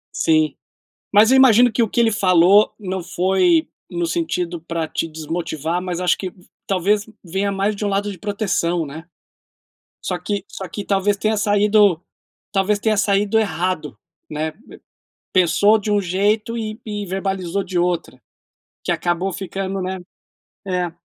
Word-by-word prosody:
Sim, 155 Hz, -2 st, +2 dB, 0.6 s
mas 215 Hz, +4 st, +6 dB
eu 265 Hz, -, +6 dB
imagino 245 Hz, -2 st, +6 dB
que 230 Hz, +2 st, +2 dB
o 220 Hz, -, -1 dB
que 235 Hz, -, -1 dB
ele 225 Hz, -1 st, +4 dB
falou, 190 Hz, +1 st, +4 dB
não 190 Hz, -3 st, -4 dB
foi 180 Hz, -2 st, +2 dB, 0.2 s
no 175 Hz, -1 st, -2 dB
sentido 170 Hz, 0 st, -2 dB
para 165 Hz, -1 st, -3 dB
te -, -, -2 dB
desmotivar 160 Hz, +1 st, -3 dB
mas 180 Hz, -1 st, -4 dB
acho 180 Hz, -, +2 dB
que 185 Hz, -2 st, -5 dB, 0.3 s
talvez 200 Hz, +2 st, +1 dB, 0.2 s
venha 195 Hz, +3 st, -1 dB
mais 200 Hz, +2 st, 0 dB
de 205 Hz, -, -5 dB
um -, -, 0 dB
lado 200 Hz, +1 st, -1 dB
de 190 Hz, -, -9 dB
proteção, 180 Hz, -4 st, -1 dB
né? 155 Hz, +4 st, -9 dB, 1.0 s
Só -, -, -1 dB
que 205 Hz, -2 st, -3 dB
só 190 Hz, -2 st, -7 dB
que 200 Hz, +4 st, -6 dB
talvez 200 Hz, +1 st, +1 dB
tenha 215 Hz, +2 st, 0 dB
saído 205 Hz, -3 st, +3 dB, 0.5 s
talvez 205 Hz, +1 st, +1 dB
tenha 215 Hz, 0 st, +1 dB
saído 200 Hz, +1 st, +2 dB
errado, 170 Hz, -, -2 dB, 0.3 s
né. 155 Hz, +1 st, -3 dB, 0.8 s
Pensou 200 Hz, +4 st, +4 dB
de 210 Hz, 0 st, -4 dB
um 205 Hz, 0 st, +3 dB
jeito 210 Hz, +5 st, 0 dB
e 215 Hz, -1 st, -4 dB
e 205 Hz, -1 st, -4 dB
verbalizou 190 Hz, 0 st, -2 dB
de 180 Hz, -1 st, -2 dB
outro, 175 Hz, -7 st, -1 dB, 0.6 s
que -, -, -1 dB
acabou 175 Hz, +2 st, -1 dB
ficando, 195 Hz, 0 st, -4 dB
né, 185 Hz, +1 st, -3 dB, 0.7 s
é. 180 Hz, -2 st, -1 dB
190 Hz, 155 wpm, -20 LUFS, 175-205 Hz, 1.0 s, mas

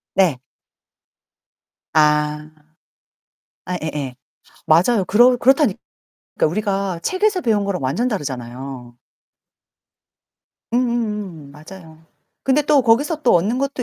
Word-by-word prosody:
네. 180 Hz, -9 st, +2 dB, 1.5 s
아. 150 Hz, 0 st, +2 dB, 1.2 s
아 180 Hz, -, -3 dB
예예 145 Hz, -5 st, -4 dB, 0.5 s
맞아요 185 Hz, +6 st, +3 dB
그러 245 Hz, +4 st, +5 dB
그렇다니 265 Hz, -3 st, +3 dB, 0.6 s
그러니까 155 Hz, -, +2 dB
우리가 195 Hz, -2 st, -2 dB
책에서 380 Hz, 0 st, 0 dB
배운 215 Hz, -7 st, +1 dB
거랑 195 Hz, -5 st, -2 dB
완전 160 Hz, -, 0 dB
다르잖아요. 130 Hz, -, -6 dB, 1.8 s
응응응 210 Hz, -, -2 dB
맞아요. 160 Hz, +2 st, -14 dB, 0.4 s
근데 270 Hz, +3 st, +2 dB
또 295 Hz, 0 st, +3 dB
거기서 285 Hz, +7 st, +1 dB
또 250 Hz, -, +4 dB
얻는 200 Hz, +8 st, +1 dB
것도 275 Hz, -1 st, -2 dB
195 Hz, 225 characters per minute, -20 LUFS, 150-245 Hz, 1.8 s, 그러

